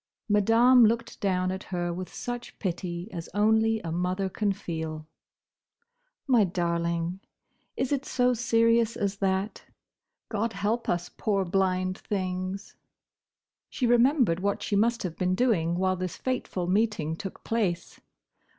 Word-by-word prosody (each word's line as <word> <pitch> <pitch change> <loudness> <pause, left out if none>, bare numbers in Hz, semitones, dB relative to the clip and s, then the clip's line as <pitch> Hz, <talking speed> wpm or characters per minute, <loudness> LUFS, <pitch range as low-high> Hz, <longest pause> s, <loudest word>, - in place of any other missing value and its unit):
Madame 230 +4 +5
looked 230 +1 +1
down 185 -2 +1
at 190 0 -5
her 175 -2 -2
with 180 +1 -6
such 245 0 -6
pity 175 -1 -3
as 170 -1 -6
only 220 +1 +3
a 165 - -5
mother 180 +3 -1
can 205 +2 0
feel. 160 -5 -5 1.2
"My 245 -6 +4
darling! 170 0 -1 0.6
Is 260 - -1
it 280 -1 0
so 250 0 +2
serious 230 -1 +2
as 200 0 -1
that? 195 +1 -1 0.7
God 225 +1 -2
help 210 +4 -1
us, 175 0 -1
poor 195 -3 0
blind 185 0 0
things!" 185 0 -4 0.9
She 255 - -2
remembered 240 - +4
what 200 +1 -1
she 205 - -1
must 230 +3 +2
have 175 -3 -4
been 185 0 +1
doing 185 -8 +2
while 185 +1 +1
this 185 -1 -4
fateful 250 -8 -2
meeting 185 -5 0
took 195 +2 -8
place. 205 -7 -2
195 Hz, 135 wpm, -27 LUFS, 180-225 Hz, 1.2 s, Madame